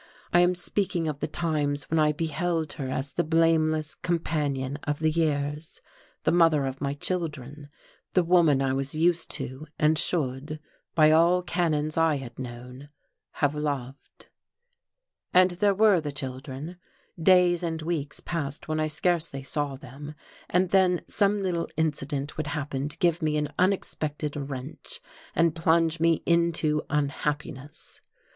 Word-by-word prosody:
I 175 Hz, -, +6 dB
am 175 Hz, +1 st, +4 dB
speaking 180 Hz, -2 st, -1 dB
of 150 Hz, -2 st, -3 dB
the 150 Hz, -, -2 dB
times 150 Hz, -3 st, -1 dB
when 160 Hz, -, +3 dB
I 150 Hz, 0 st, +4 dB
beheld 165 Hz, +1 st, -2 dB
her 135 Hz, -3 st, -5 dB
as 135 Hz, +2 st, -3 dB
the -, -, +1 dB
blameless 155 Hz, -1 st, +2 dB
companion 145 Hz, -5 st, -2 dB
of 145 Hz, 0 st, -1 dB
the 155 Hz, +1 st, +1 dB
years, 150 Hz, -1 st, -1 dB, 0.4 s
the -, -, +3 dB
mother 165 Hz, -4 st, +4 dB
of 135 Hz, 0 st, -5 dB
my 140 Hz, 0 st, -1 dB
children, 145 Hz, -4 st, -4 dB, 0.4 s
the 180 Hz, -, +4 dB
woman 165 Hz, -6 st, +4 dB
I 130 Hz, -1 st, +1 dB
was 135 Hz, +2 st, -2 dB
used 170 Hz, +1 st, +2 dB
to 130 Hz, +5 st, -5 dB
and 155 Hz, 0 st, +3 dB
should 150 Hz, -1 st, -1 dB, 0.4 s
by 155 Hz, -1 st, +6 dB
all 170 Hz, +3 st, +4 dB
canons 155 Hz, -4 st, 0 dB
I 165 Hz, -2 st, +3 dB
had 125 Hz, -3 st, -9 dB
known 125 Hz, +2 st, -8 dB, 0.4 s
have 145 Hz, 0 st, +1 dB
loved.... 140 Hz, -3 st, -5 dB, 1.1 s
And 185 Hz, 0 st, +6 dB
there 200 Hz, +3 st, +2 dB
were 205 Hz, -4 st, +5 dB
the 150 Hz, -1 st, -4 dB
children. 135 Hz, +4 st, -6 dB, 0.4 s
Days 180 Hz, 0 st, +5 dB
and 165 Hz, -2 st, -2 dB
weeks 155 Hz, -3 st, -3 dB
passed 150 Hz, -4 st, -4 dB
when 155 Hz, 0 st, -1 dB
I 155 Hz, -, +1 dB
scarcely 155 Hz, -3 st, -1 dB
saw 140 Hz, +1 st, -2 dB
them, 140 Hz, +3 st, -10 dB, 0.3 s
and 180 Hz, 0 st, +2 dB
then 185 Hz, -2 st, +3 dB
some 205 Hz, 0 st, +2 dB
little 175 Hz, -3 st, -1 dB
incident 145 Hz, -2 st, -2 dB
would 155 Hz, -1 st, -2 dB
happen 145 Hz, -1 st, -3 dB
to -, -, -10 dB
give 175 Hz, -1 st, +2 dB
me 155 Hz, -1 st, +1 dB
an 150 Hz, -1 st, -1 dB
unexpected 155 Hz, -6 st, -1 dB
wrench 140 Hz, 0 st, -6 dB, 0.4 s
and 165 Hz, -1 st, +3 dB
plunge 165 Hz, 0 st, +2 dB
me 165 Hz, 0 st, +2 dB
into 170 Hz, -3 st, +2 dB
unhappiness. 145 Hz, -1 st, -3 dB
155 Hz, 150 wpm, -27 LUFS, 145-170 Hz, 1.1 s, I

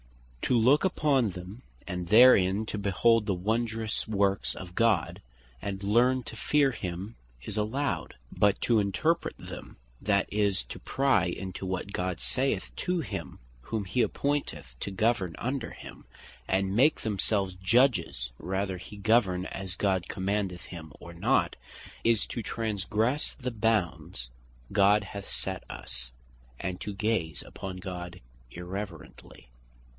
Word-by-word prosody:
To 125 Hz, -, +2 dB
look 130 Hz, +6 st, +5 dB
upon 145 Hz, -, +3 dB
them 90 Hz, +5 st, -8 dB, 0.3 s
and 90 Hz, -1 st, -3 dB
therein 105 Hz, -3 st, +7 dB
to 105 Hz, -, -4 dB
behold 105 Hz, +3 st, +3 dB
the 100 Hz, -, +1 dB
wondrous 110 Hz, +3 st, -1 dB
works 100 Hz, -2 st, +1 dB
of 90 Hz, -2 st, -9 dB
God, 115 Hz, -8 st, +2 dB, 0.4 s
and 95 Hz, -1 st, -4 dB
learn 120 Hz, +5 st, +3 dB
to -, -, -8 dB
fear 140 Hz, +3 st, +3 dB
him 95 Hz, 0 st, -5 dB, 0.3 s
is 100 Hz, -, -6 dB
allowed; 115 Hz, +7 st, -1 dB, 0.2 s
but 100 Hz, -1 st, +3 dB
to 115 Hz, -2 st, +4 dB
interpret 105 Hz, -, 0 dB
them; -, -, -9 dB, 0.2 s
that 100 Hz, -2 st, +2 dB
is, 100 Hz, -8 st, +2 dB
to -, -, -8 dB
pry 135 Hz, -9 st, +2 dB
into 95 Hz, +2 st, -5 dB
what 95 Hz, +2 st, -3 dB
God 90 Hz, -1 st, -2 dB
saith 60 Hz, -1 st, -1 dB
to 180 Hz, 0 st, 0 dB
him 160 Hz, -, -5 dB, 0.2 s
whom 105 Hz, -, -3 dB
he 95 Hz, +7 st, +1 dB
appointeth 140 Hz, -, -1 dB
to 100 Hz, -, -3 dB
govern 95 Hz, -4 st, +1 dB
under 130 Hz, 0 st, -2 dB
him, -, -, -11 dB, 0.4 s
and 95 Hz, +1 st, +1 dB
make 140 Hz, +7 st, +4 dB
themselves 100 Hz, -2 st, 0 dB
Judges 95 Hz, -, +2 dB
whether 95 Hz, 0 st, -2 dB
he 100 Hz, +3 st, -10 dB
govern 100 Hz, -3 st, +3 dB
as 95 Hz, -1 st, -5 dB
God 95 Hz, -3 st, 0 dB
commandeth 95 Hz, -2 st, -1 dB
him, 80 Hz, -3 st, -9 dB
or 85 Hz, -, -10 dB
not, 85 Hz, -, +2 dB, 0.5 s
is 115 Hz, -3 st, +3 dB
to 120 Hz, -, -4 dB
transgresse 110 Hz, +5 st, 0 dB
the 125 Hz, -2 st, -4 dB
bounds 90 Hz, -, -1 dB, 0.4 s
God 100 Hz, +1 st, +5 dB
hath 100 Hz, 0 st, -8 dB
set -, -, -3 dB
us, -, -, -6 dB, 0.5 s
and 90 Hz, -2 st, -4 dB
to 105 Hz, -, -3 dB
gaze 100 Hz, -8 st, -1 dB
upon 95 Hz, -1 st, -7 dB
God 90 Hz, -1 st, -6 dB, 0.3 s
irreverently. 90 Hz, -6 st, -8 dB
100 Hz, 140 wpm, -29 LUFS, 90-115 Hz, 0.5 s, therein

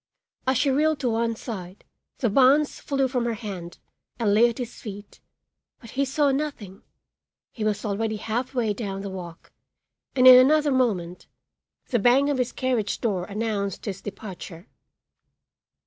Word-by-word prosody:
As 260 Hz, -1 st, +3 dB
she 275 Hz, +2 st, +2 dB
reeled 305 Hz, +2 st, +2 dB
to 250 Hz, -, +1 dB
one 230 Hz, 0 st, 0 dB
side 195 Hz, -5 st, -8 dB, 0.3 s
the 240 Hz, -, 0 dB
bonds 275 Hz, +5 st, +4 dB
flew 275 Hz, -2 st, 0 dB
from 250 Hz, -2 st, -1 dB
her 235 Hz, -1 st, -1 dB
hand 190 Hz, -6 st, -7 dB, 0.4 s
and 215 Hz, -4 st, +1 dB
lay 235 Hz, +3 st, +5 dB
at 230 Hz, -, -7 dB
his 245 Hz, -2 st, -7 dB
feet; 205 Hz, -1 st, -9 dB, 0.6 s
but 230 Hz, -3 st, -13 dB
he 275 Hz, +1 st, 0 dB
saw 280 Hz, +1 st, +2 dB
nothing; 265 Hz, -9 st, -4 dB, 0.7 s
he 225 Hz, -, -6 dB
was 215 Hz, +1 st, -1 dB
already 220 Hz, +2 st, -1 dB
half 240 Hz, +5 st, -3 dB
way 225 Hz, -4 st, +1 dB
down 195 Hz, -3 st, -5 dB
the 200 Hz, -1 st, -6 dB
walk 175 Hz, -3 st, -9 dB, 0.6 s
and 255 Hz, -1 st, +4 dB
in 255 Hz, 0 st, +11 dB
another 295 Hz, +3 st, +4 dB
moment 195 Hz, -10 st, -1 dB, 0.6 s
the 240 Hz, -, +1 dB
bang 260 Hz, +6 st, +4 dB
of 275 Hz, -, -1 dB
his 250 Hz, -1 st, 0 dB
carriage 250 Hz, -5 st, -1 dB
door 195 Hz, -6 st, -1 dB
announced 205 Hz, -2 st, -3 dB
his 195 Hz, -3 st, -5 dB
departure. 195 Hz, -3 st, -9 dB
230 Hz, 160 wpm, -25 LUFS, 200-260 Hz, 0.7 s, in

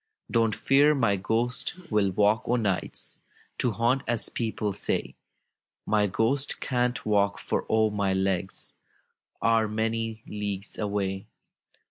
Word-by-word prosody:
"Don't 115 Hz, -2 st, +2 dB
fear 145 Hz, +3 st, +4 dB
my 115 Hz, -7 st, +2 dB
ghost 115 Hz, -, -1 dB
will 105 Hz, -2 st, +3 dB
walk 105 Hz, +3 st, +2 dB
o' 120 Hz, -, +3 dB
nights 105 Hz, -6 st, -3 dB, 0.4 s
To 125 Hz, -, +1 dB
haunt, 120 Hz, +4 st, +1 dB
as 120 Hz, -2 st, +3 dB
people 110 Hz, -3 st, -2 dB
say; -, -, -1 dB, 0.7 s
My 105 Hz, -1 st, +2 dB
ghost 135 Hz, +8 st, +1 dB
can't 125 Hz, -1 st, -1 dB
walk, 100 Hz, -1 st, +2 dB
for, -, -, -2 dB
oh! 110 Hz, -1 st, +3 dB
my 100 Hz, -2 st, 0 dB
legs 95 Hz, -1 st, -1 dB, 0.7 s
Are 115 Hz, -1 st, +3 dB
many 110 Hz, +1 st, -2 dB
leagues 100 Hz, -1 st, -5 dB
away! 100 Hz, -2 st, -2 dB
110 Hz, 125 wpm, -27 LUFS, 100-115 Hz, 0.7 s, fear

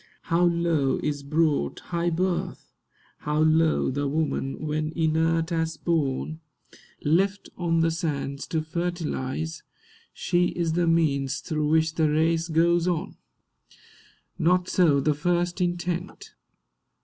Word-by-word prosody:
How 175 Hz, +1 st, +4 dB
low 170 Hz, -5 st, +1 dB
is 145 Hz, -2 st, -1 dB
brought 155 Hz, +1 st, 0 dB
high 170 Hz, 0 st, +1 dB
birth! 180 Hz, +2 st, -2 dB, 0.5 s
How 150 Hz, 0 st, -2 dB
low 155 Hz, -1 st, +3 dB
the 145 Hz, +2 st, -1 dB
woman; 150 Hz, -1 st, -2 dB
when, 155 Hz, +1 st, -1 dB
inert 160 Hz, +1 st, +1 dB
as 165 Hz, -1 st, 0 dB
spawn 155 Hz, -1 st, -1 dB, 0.6 s
Left 195 Hz, +6 st, +1 dB
on 165 Hz, -2 st, +1 dB
the 165 Hz, 0 st, +2 dB
sands 145 Hz, -4 st, -3 dB
to 160 Hz, -1 st, -1 dB
fertilise, 160 Hz, -2 st, -3 dB, 0.5 s
She 175 Hz, 0 st, +1 dB
is 170 Hz, -2 st, 0 dB
the 175 Hz, 0 st, +1 dB
means 145 Hz, -4 st, +1 dB
through 155 Hz, -1 st, -2 dB
which 160 Hz, +1 st, +2 dB
the 160 Hz, -2 st, +2 dB
race 160 Hz, +2 st, +1 dB
goes 170 Hz, +1 st, +2 dB
on! 180 Hz, +2 st, -2 dB, 1.2 s
Not 180 Hz, +2 st, +2 dB
so 165 Hz, -8 st, +3 dB
the 150 Hz, +2 st, +2 dB
first 175 Hz, +4 st, -1 dB
intent. 175 Hz, 0 st, -3 dB
160 Hz, 125 wpm, -25 LUFS, 155-170 Hz, 1.2 s, How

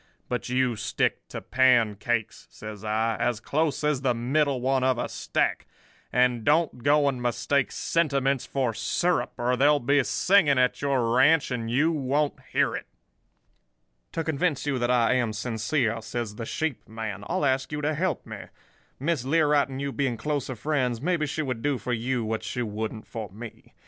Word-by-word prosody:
But 125 Hz, 0 st, -3 dB
you 125 Hz, -1 st, +1 dB
stick -, -, -1 dB
to -, -, -7 dB
pancakes,' 120 Hz, -3 st, +1 dB
says 105 Hz, -1 st, -9 dB
I, 110 Hz, +1 st, 0 dB
'as 120 Hz, -3 st, 0 dB
close 150 Hz, +4 st, -1 dB
as 150 Hz, -3 st, +1 dB
the 125 Hz, -3 st, +1 dB
middle 135 Hz, +3 st, +1 dB
one 130 Hz, +1 st, +1 dB
of 130 Hz, -1 st, +2 dB
a -, -, -2 dB
stack; -, -, -1 dB, 0.4 s
and 125 Hz, -2 st, +2 dB
don't 150 Hz, -2 st, +2 dB
go 145 Hz, +2 st, +4 dB
and 130 Hz, -3 st, -1 dB
mistake 120 Hz, +3 st, 0 dB
sentiments 140 Hz, -5 st, 0 dB
for 130 Hz, -4 st, -1 dB
syrup, 165 Hz, +10 st, 0 dB
or 125 Hz, +1 st, +1 dB
there'll 145 Hz, +3 st, +4 dB
be 140 Hz, +2 st, +2 dB
singing 175 Hz, -3 st, +3 dB
at 125 Hz, 0 st, +2 dB
your 130 Hz, -5 st, +1 dB
ranch, 145 Hz, +3 st, +4 dB
and 115 Hz, -2 st, -3 dB
you 145 Hz, +8 st, +2 dB
won't 145 Hz, 0 st, 0 dB, 0.2 s
hear -, -, +2 dB
it.' -, -, -6 dB, 1.2 s
"'To 165 Hz, -, -2 dB
convince 155 Hz, -2 st, -1 dB
you 140 Hz, -3 st, 0 dB
that 120 Hz, 0 st, 0 dB
I 125 Hz, -1 st, +3 dB
am 120 Hz, -4 st, 0 dB
sincere,' 115 Hz, +1 st, -1 dB
says 110 Hz, -1 st, -4 dB
the 115 Hz, +1 st, -6 dB
sheep 160 Hz, -5 st, -3 dB
man, 110 Hz, -2 st, -5 dB
'I'll -, -, 0 dB
ask 135 Hz, +1 st, 0 dB
you 150 Hz, 0 st, -3 dB
to 150 Hz, +1 st, 0 dB
help 165 Hz, -1 st, -1 dB
me. -, -, -8 dB, 0.5 s
Miss 145 Hz, -1 st, 0 dB
Learight 145 Hz, 0 st, +3 dB
and 135 Hz, 0 st, -6 dB
you 140 Hz, 0 st, -2 dB
being 135 Hz, -4 st, -1 dB
closer 140 Hz, +1 st, -2 dB
friends, 125 Hz, -1 st, -1 dB
maybe 160 Hz, +1 st, 0 dB
she 155 Hz, +2 st, -2 dB
would 125 Hz, -5 st, -3 dB
do 145 Hz, 0 st, 0 dB
for 125 Hz, -, -3 dB
you 120 Hz, 0 st, -1 dB
what 110 Hz, 0 st, -2 dB
she 125 Hz, -, -3 dB
wouldn't 110 Hz, 0 st, -4 dB
for 110 Hz, -3 st, -6 dB
me. 110 Hz, +3 st, -11 dB
130 Hz, 180 wpm, -26 LUFS, 115-145 Hz, 1.2 s, go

